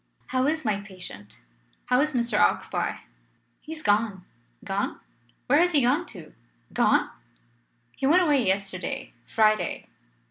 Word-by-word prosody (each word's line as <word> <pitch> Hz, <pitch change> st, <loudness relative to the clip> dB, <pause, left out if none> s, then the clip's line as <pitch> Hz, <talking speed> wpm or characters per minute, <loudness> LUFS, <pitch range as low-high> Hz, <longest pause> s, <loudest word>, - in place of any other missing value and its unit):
"How 255 Hz, +1 st, +1 dB
is 310 Hz, -1 st, -1 dB
my 210 Hz, -2 st, +1 dB
patient? 185 Hz, -, -11 dB, 0.4 s
How 250 Hz, +1 st, +3 dB
is 305 Hz, +1 st, 0 dB
Mr. 235 Hz, -3 st, 0 dB
Oxbye?" 95 Hz, 0 st, +1 dB, 0.6 s
"He 320 Hz, -, -8 dB
is 315 Hz, -, -10 dB
gone." 205 Hz, -3 st, +1 dB, 0.4 s
"Gone? -, -, -2 dB, 0.5 s
Where 285 Hz, +4 st, +4 dB
has 355 Hz, 0 st, +3 dB
he 285 Hz, -4 st, +4 dB
gone 290 Hz, +9 st, +2 dB
to? 175 Hz, -7 st, -12 dB, 0.4 s
Gone?" -, -, +3 dB, 0.8 s
"He 270 Hz, -, -1 dB
went 355 Hz, +5 st, +5 dB
away 290 Hz, -6 st, +3 dB
yesterday 190 Hz, -1 st, -2 dB
Friday. 215 Hz, -1 st, +1 dB
235 Hz, 135 wpm, -26 LUFS, 195-290 Hz, 0.8 s, went